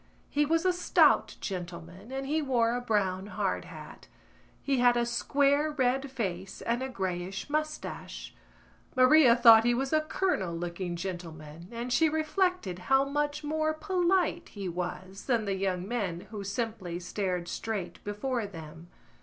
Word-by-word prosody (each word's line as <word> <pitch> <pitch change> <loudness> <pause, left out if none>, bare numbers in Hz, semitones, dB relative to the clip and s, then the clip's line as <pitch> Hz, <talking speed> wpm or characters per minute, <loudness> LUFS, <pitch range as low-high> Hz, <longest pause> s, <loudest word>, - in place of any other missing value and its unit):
He 295 0 +2
was 330 +3 +1
a 365 - +4
stout 355 - +3
gentleman 180 +3 -6
and 270 0 -3
he 310 +3 0
wore 240 -5 +2
a 245 - -2
brown 200 -5 0
hard - - -2
hat; - - -11 0.6
he 275 -2 +1
had 245 0 +5
a 240 - +2
square 280 +5 +2
red 270 -1 0
face 195 -7 -4
and 235 +2 0
a 265 - -3
greyish 190 +1 -4
moustache. 305 0 -4 0.6
Maria 255 -1 +7
thought 230 -2 +8
he 240 +1 +3
was 270 +4 -2
a 310 - +4
colonel 310 - -1
looking 175 +1 -4
gentleman 170 -3 -7
and 240 +1 -3
she 320 +3 +4
reflected 315 - 0
how 270 +1 +5
much 295 +1 -1
more 310 +1 0
polite 355 -1 +1
he 200 -3 -6
was 180 +2 -5
than 235 -4 +1
the 200 - 0
young 190 -1 -2
men 200 -7 -2
who 210 -2 -5
simply 200 -4 -3
stared 180 -1 -3
straight 190 -6 -4
before 215 +2 -2
them. 165 -2 -10
230 Hz, 155 wpm, -29 LUFS, 185-285 Hz, 0.6 s, thought